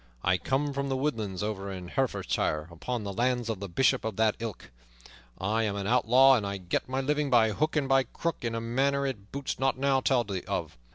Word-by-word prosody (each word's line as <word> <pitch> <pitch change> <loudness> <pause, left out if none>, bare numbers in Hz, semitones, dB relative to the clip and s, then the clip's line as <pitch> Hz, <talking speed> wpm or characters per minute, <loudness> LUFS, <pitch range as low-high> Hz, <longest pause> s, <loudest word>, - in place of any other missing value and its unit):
I 90 -1 +2
come 140 +9 0
from 140 0 -2
the 135 - 0
woodlands 110 -9 -2
over 100 -2 -3
in 90 -2 -7
Herefordshire, 85 - -1
upon 115 +8 -4
the 100 -1 -4
lands 120 +1 0
of 110 -4 -2
the 100 -1 -6
Bishop 130 +8 +2
of 110 -2 -3
that 110 0 +2
ilk. 115 -4 -6 0.7
I 105 +4 0
am 105 -2 -1
an 100 -1 -3
outlaw, 125 +4 +5
and 100 -3 -5
get - - -1
my 130 +1 0
living 150 +1 0
by 115 -3 +4
hook 155 +8 -1
and 145 -3 +1
by 135 -1 +4
crook 170 +7 -3
in 115 -2 -2
a 115 - -2
manner 135 +4 +1
it 105 -7 -5
boots 140 -1 -4
not 135 -1 +1
now 135 0 +2
to - - -2
tell 115 -8 +1
of. - - -3
120 Hz, 220 wpm, -28 LUFS, 100-135 Hz, 0.7 s, outlaw